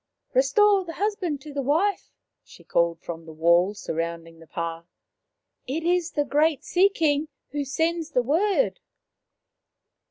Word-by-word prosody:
" - - -46
Restore 390 +10 +4
the 335 -2 -7
husband 380 -7 -2
to 295 +1 -10
the 280 - -1
wife," 325 +10 +1 0.3
she - - -17
called 170 -1 +1
from 165 -1 -7
the - - -8
wall 170 +5 +3
surrounding 165 -2 -5
the 165 - -15
pah. 165 0 -4 0.5
" - - -58
It 305 +6 -2
is 350 0 +1
the 290 -1 +1
great 300 +1 +2
Sea 375 +3 +4
king 310 -5 +1 0.2
who 290 -1 -2
sends 320 +4 -1
the 250 -5 +1
word." 390 - +1
290 Hz, 155 wpm, -25 LUFS, -, 0.5 s, Restore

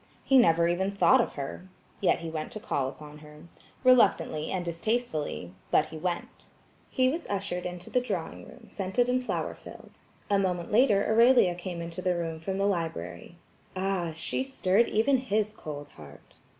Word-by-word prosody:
He 270 -1 +5
never 170 -7 +4
even 180 +3 0
thought 220 +6 +4
of - - -3
her. 145 +6 -7 0.3
Yet 190 - +2
he 165 - -5
went 155 -1 -4
to 215 - -6
call 135 -9 -1
upon 150 +1 -12
her. 150 0 -14 0.4
Reluctantly 205 -11 +3
and 185 -2 -2
distastefully–but 160 - -1
he 160 - -8
went. 175 +1 -4 0.4
He 255 0 +2
was 325 +5 -3
ushered 190 -3 -2
into 180 0 -8
the 250 - +2
drawing 250 - -5
room - - -14
scented 200 +5 -1
and 255 +1 +1
flower - - -2
filled. - - -14 0.3
A 200 -1 +2
moment 180 -3 -1
later 210 -3 +4
Aurelia 230 -4 +5
came 175 -1 -6
into 170 +2 -6
the 180 -1 +1
room 165 -2 -3
from 190 +4 -3
the 195 - +1
library. 165 - -3 0.4
Ah, 185 -3 -1
she 160 - -2
stirred 235 -5 +1
even 245 +6 +3
his 215 -4 -1
cold 145 -6 -8
heart. 75 - -15
185 Hz, 170 wpm, -28 LUFS, 160-220 Hz, 0.4 s, He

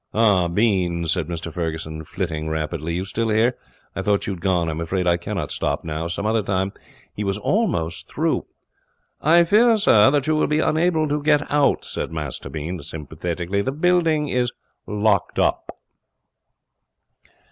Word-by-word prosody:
'Ah, 105 -5 +4
Bean,' 90 -3 +1
said 80 -1 -1
Mr 85 -1 -5
Ferguson, 80 -2 -4
flitting 80 -2 -4
rapidly, 80 +1 -3
'you 90 +2 -2
still 110 +4 -2
here? 115 +3 +2 0.4
I - - -2
thought 100 +1 +1
you 100 - -2
had 90 - -9
gone. 90 -3 +1
I'm 80 0 -3
afraid 90 +2 -1
I 85 -1 +4
cannot 85 - -4
stop - - -2
now. 80 +1 -3
Some 85 +4 -4
other 110 +1 +2
time 95 -1 -1 0.2
' - - -29
He 105 - -3
was 100 0 -1
almost 105 - -1
through. - - -1 0.7
'I 170 +3 +5
fear, 220 +6 +4
sir, 110 - +6
that 140 -1 +1
you 155 - +2
will 155 - +2
be 150 - +1
unable 160 0 +2
to 150 0 -1
get 150 0 +3
out,' 145 -1 +2
said - - -4
Master 75 -5 -5
Bean, 80 +3 -5
sympathetically. 85 +5 -3
'The 130 - -1
building 160 -2 +2
is 125 -2 0 0.4
locked 105 -3 +1
up.' - - +1
95 Hz, 170 wpm, -22 LUFS, 85-140 Hz, 0.7 s, sir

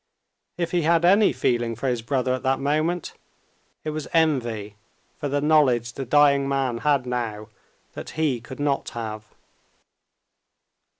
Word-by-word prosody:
If 170 -1 -2
he 175 - +1
had 165 +1 +3
any 200 +3 +5
feeling 120 -2 0
for 135 - -3
his 120 -2 0
brother 130 +1 0
at 130 - -3
that 130 0 0
moment, 155 +5 -1 0.7
it 155 - -3
was 150 -2 -5
envy 120 -10 0 0.4
for 145 - -3
the 145 +1 0
knowledge 130 -6 +3
the 135 - -5
dying 140 +1 +4
man 135 -4 -1
had 140 -2 +1
now 115 -4 -4 0.4
that - - -8
he 145 -7 0
could 125 +4 -10
not 145 -1 -1
have. 110 -2 -5
135 Hz, 145 wpm, -24 LUFS, 120-150 Hz, 0.7 s, any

